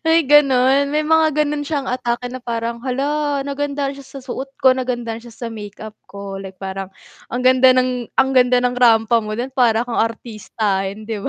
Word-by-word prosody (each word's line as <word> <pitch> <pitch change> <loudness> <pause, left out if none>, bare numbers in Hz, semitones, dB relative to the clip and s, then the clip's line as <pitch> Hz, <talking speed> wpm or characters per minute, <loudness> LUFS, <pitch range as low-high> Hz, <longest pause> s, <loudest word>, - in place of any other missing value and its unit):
May 325 -1 +4
ganun, 275 -1 +4
may 300 +2 0
mga 315 -1 +3
ganon 295 0 -2
siyang 290 -1 -3
atake 245 -1 -2
na 255 - -6
parang, 235 -1 -4
hala 285 +3 -1
nagandahan 280 0 -3
siya 275 0 -12
sa - - -7
suot 265 +1 -5
ko, 260 -1 +5
nagandahan 240 -3 -3
siya 240 - -13 0.2
sa - - -3
make-up 210 0 -9 0.2
ko, 200 -1 -7
like 190 -1 -10
parang, 195 0 -6 0.4
ang 250 +1 -4
ganda 255 0 +6
ng 250 -2 0
ang 265 0 +3
ganda 250 -1 +3
ng 250 - +2
rampa 230 -2 +3
mo 215 -1 -5
din, 250 +3 -4
parang 240 -3 +2
kang 245 -1 -2
artistahin, 215 -3 -3
'di 215 -1 -4
ba? - - -3
250 Hz, 190 wpm, -19 LUFS, 225-275 Hz, 0.4 s, ganda